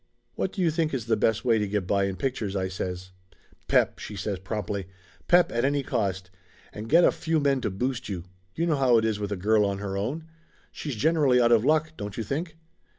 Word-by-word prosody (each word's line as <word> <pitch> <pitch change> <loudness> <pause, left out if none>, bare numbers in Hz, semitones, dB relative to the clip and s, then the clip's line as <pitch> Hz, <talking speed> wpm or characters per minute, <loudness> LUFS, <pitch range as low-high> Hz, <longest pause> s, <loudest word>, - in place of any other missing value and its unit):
"What 190 - -2
do 190 - -2
you 165 - +3
think 155 -2 0
is 120 -4 -3
the 115 -1 +2
best 110 +2 +1
way 115 -3 +3
to 105 - -1
get 100 -1 -1
by 100 +1 +1
in 100 -1 -2
pictures?" 110 -5 -3
I 95 -1 -1
says. 95 0 -5 0.6
"Pep!" - - +2
she 105 - -7
says 100 0 -3
promptly. 100 -1 -4 0.4
"Pep, 175 0 +5
at 120 +1 0
any 140 +1 +1
cost. 95 -7 -2 0.4
And 110 +2 -7
get 170 +3 +6
a - - +6
few 160 -1 -1
men 140 -2 +1
to 110 - -1
boost 125 +6 -3
you. 90 -4 -4 0.3
You 165 - 0
know 160 -4 +1
how 130 -3 +4
it 110 - +2
is 110 -2 0
with 105 0 -4
a - - 0
girl 105 +3 +3
on 100 -1 0
her 100 -1 -4
own. 130 +12 -3 0.5
She's 145 -5 -5
generally 145 0 +3
out 120 -1 +4
of 115 -2 +5
luck, 155 +3 +2
don't 100 -1 -6
you 115 - -2
think?" 160 - -4
115 Hz, 230 wpm, -26 LUFS, 100-140 Hz, 0.6 s, get